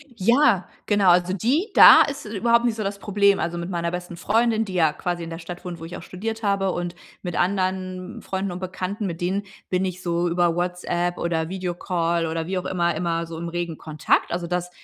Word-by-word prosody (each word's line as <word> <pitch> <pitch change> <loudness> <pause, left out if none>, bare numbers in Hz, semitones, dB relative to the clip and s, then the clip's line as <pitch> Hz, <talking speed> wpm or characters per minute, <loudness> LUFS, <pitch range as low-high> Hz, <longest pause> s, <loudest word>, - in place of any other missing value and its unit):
Ja, 230 -2 +3 0.2
genau, 205 -3 +3
also 180 +1 +4
die 270 - +1
da - - +10
ist 280 -1 -5
überhaupt 235 +3 +2
nicht 235 -2 +1
so 220 - -3
das 200 0 -3
Problem. 200 -1 +3
Also, 170 0 -2
mit 170 +1 -4
meiner 170 -2 -2
besten 180 0 -5
Freundin, 225 +5 +1
die 190 - -7
ja 160 -4 +3
quasi 175 +1 -3
in 165 - -6
der 165 - -6
Stadt 175 +1 -9
wohnt, 175 -2 -6
wo 165 - -7
ich 170 - -7
auch - - -10
studiert 220 +6 -5
habe, 195 -2 +1
und 175 0 -4 0.3
mit 175 -2 -4
anderen 185 0 -1
Freunden 190 0 -3
und 175 - -6
Bekannten, 190 +3 -4
mit 170 -3 -4
denen 190 +3 0 0.3
bin 185 0 +1
ich 185 -1 -4
so 175 -1 0
über 170 -1 +2
WhatsApp 175 0 -1
oder 165 -1 -1
Video-Call 175 -2 -1
oder 160 0 -3
wie 190 +1 -2
auch 180 - -3
immer, 170 -2 0
immer 170 0 -1
so 165 0 -7
im 170 +1 -4
regen 170 -2 -4
Kontakt. 155 -1 0
Also, 175 0 -2
das 180 0 -2
180 Hz, 220 wpm, -23 LUFS, 170-195 Hz, 0.3 s, da